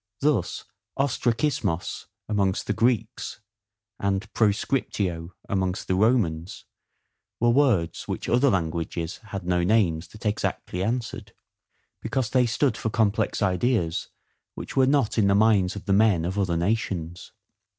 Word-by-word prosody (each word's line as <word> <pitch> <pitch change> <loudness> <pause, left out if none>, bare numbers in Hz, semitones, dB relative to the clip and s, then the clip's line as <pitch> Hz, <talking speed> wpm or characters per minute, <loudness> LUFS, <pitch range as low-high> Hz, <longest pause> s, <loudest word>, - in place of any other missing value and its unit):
Thus 140 - 0 0.3
ostrakismos 120 - -1 0.2
amongst 100 -3 0
the 105 - 0
Greeks, 115 +2 -1 0.6
and 100 +2 -2
proscriptio 100 -5 0
amongst 95 -2 -1
the - - +1
Romans, 95 -5 +1 0.7
were 120 +1 +4
words 120 - +2
which - - -4
other 125 +4 +4
languages 85 -2 -2
had 100 -4 -6
no 90 0 +1
names 90 -5 +2
that 110 +6 -14
exactly 100 -3 -2
answered; 115 +2 -3 0.7
because 130 -5 -2
they 125 -2 +3
stood 120 0 +1
for 110 - -2
complex 110 -1 +1
ideas 90 -2 0 0.5
which - - -7
were 130 -1 +4
not 135 -5 +2
in 100 - +4
the 100 - +4
minds 105 -3 +3
of 100 - -8
the 100 - +1
men 100 -5 +4
of 95 +3 -2
other 90 -4 +1
nations. 90 -3 -2
100 Hz, 130 wpm, -25 LUFS, 90-115 Hz, 0.7 s, were